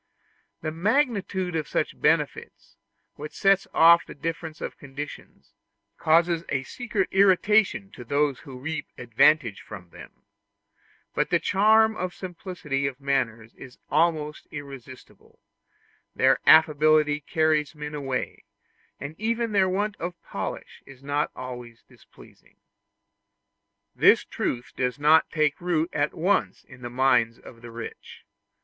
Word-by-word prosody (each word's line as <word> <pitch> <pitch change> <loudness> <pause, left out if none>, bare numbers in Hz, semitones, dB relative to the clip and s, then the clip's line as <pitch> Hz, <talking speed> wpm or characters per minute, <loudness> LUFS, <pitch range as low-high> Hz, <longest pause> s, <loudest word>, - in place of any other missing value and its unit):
The 155 - -3
magnitude 195 - 0
of 155 -3 -2
such - - -2
benefits, - - -1 0.4
which 150 +1 -8
sets 195 0 +2
off 170 +1 +6
the - - -12
difference 160 +1 -5
of - - -7
conditions, 140 +1 -10 0.5
causes 165 +1 +3
a 135 -1 -1
secret 220 - -3
irritation 200 +1 +3
to 120 - -10
those 140 +2 0
who 130 -2 -11
reap 155 +4 -5
advantage 120 -1 +2
from 90 -5 -11
them; - - -14 0.9
but - - 0
the - - +3
charm 220 +2 +4
of 185 -3 -4
simplicity 170 -6 -4
of 135 -1 -6
manners 120 -5 -2
is 130 -1 -13
almost 155 -1 0
irresistible: 135 -3 -11 0.8
their 130 0 +3
affability 155 -1 +5
carries 155 0 0
men 150 0 -7
away, 135 -3 -4 0.6
and 140 +2 -6
even 230 +1 -1
their 195 -2 +3
want 205 +2 -1
of 175 +1 -5
polish - - -6
is 135 -1 -15
not 145 +1 -1
always 125 -2 -9
displeasing. - - -20 1.4
This - - +5
truth 120 0 -4
does 125 0 -1
not 150 +2 +4
take 155 -1 0
root 170 -2 0
at 145 +1 -1
once 190 +5 0
in 125 - -16
the 120 - -6
minds 120 -2 +2
of 115 -2 -15
the 120 - -10
rich. 115 0 -10
150 Hz, 130 wpm, -25 LUFS, 135-180 Hz, 1.4 s, off